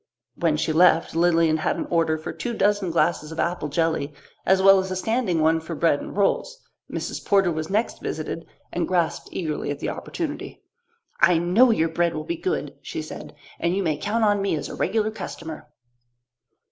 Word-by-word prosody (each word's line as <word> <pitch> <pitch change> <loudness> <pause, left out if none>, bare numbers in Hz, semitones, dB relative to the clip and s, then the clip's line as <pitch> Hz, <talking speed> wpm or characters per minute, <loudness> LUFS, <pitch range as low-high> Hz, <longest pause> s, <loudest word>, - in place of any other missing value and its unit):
When 160 -3 +1
she 155 - 0
left, 165 0 +4
Lilian 165 -2 +3
had 155 - -1
an - - -2
order 165 -2 +2
for 155 - -6
two 240 -2 -4
dozen 205 -2 +2
glasses 165 -2 +1
of 160 - -7
apple 170 -3 -1
jelly, 150 -1 0 0.4
as 190 +1 +5
well 195 0 +7
as 190 0 -3
a 185 - -2
standing 195 -4 0
one 160 +1 +3
for 160 +1 -6
bread 160 -3 +2
and - - -8
rolls. 485 - +1 0.3
Mrs. - - -4
Porter 195 -3 +3
was 155 0 -3
next 215 +4 -1
visited 160 +1 -4 0.3
and 175 -1 -1
grasped 175 -3 0
eagerly 155 -5 -3
at 145 - -2
the - - -3
opportunity. 305 -3 -5 0.6
"I 170 0 +5
know 180 +10 +4
your 165 -7 +2
bread 170 +1 0
will 155 - -3
be 340 - -3
good," 370 +4 -2
she - - -5
said, - - -9 0.2
"and 170 +1 0
you 200 - 0
may 160 -4 +1
count 220 +9 -1
on 205 -1 +3
me 195 -4 0
as 150 - -4
a - - -6
regular 220 -1 0
customer." 160 -8 -7
175 Hz, 195 wpm, -24 LUFS, 160-200 Hz, 0.6 s, well